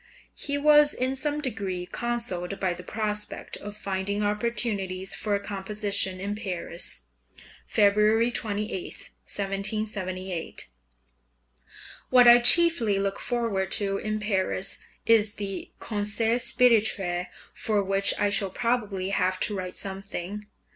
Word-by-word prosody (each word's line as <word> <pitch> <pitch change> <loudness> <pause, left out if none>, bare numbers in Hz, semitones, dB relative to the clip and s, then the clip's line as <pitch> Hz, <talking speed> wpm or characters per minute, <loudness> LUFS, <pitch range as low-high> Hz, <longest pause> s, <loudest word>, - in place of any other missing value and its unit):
He 285 0 -3
was 295 0 +5
in 260 +1 -1
some 295 +2 +1
degree 200 -9 -3
consoled 200 -4 -2
by 185 -2 0
the 180 - -9
prospect 210 +2 -4
of 205 0 -8
finding 200 +1 -2
opportunities 205 -3 -1
for 205 -1 0
composition 200 -1 -1
in 200 +2 -3
Paris 180 -4 -3 0.6
(February 215 +2 +3
28, 210 -3 -3 0.2
1778) 195 -3 -4 1.4
What 250 -1 +7
I 240 0 +10
chiefly 245 - +6
look 195 0 -1
forward 230 -6 -1
to 200 -2 +1
in 215 0 -2
Paris 195 -2 -1 0.3
is 220 -2 +4
the 195 -2 -5
Concert 220 +2 -1
Spirituel, 205 -8 +2 0.3
for 210 -2 0
which 195 +1 +2
I 205 - +1
shall 200 -1 +1
probably 210 -5 -1
have 185 -1 +1
to 210 - 0
write 185 -1 -4
something. 195 +1 -6
205 Hz, 115 wpm, -26 LUFS, 195-225 Hz, 1.4 s, I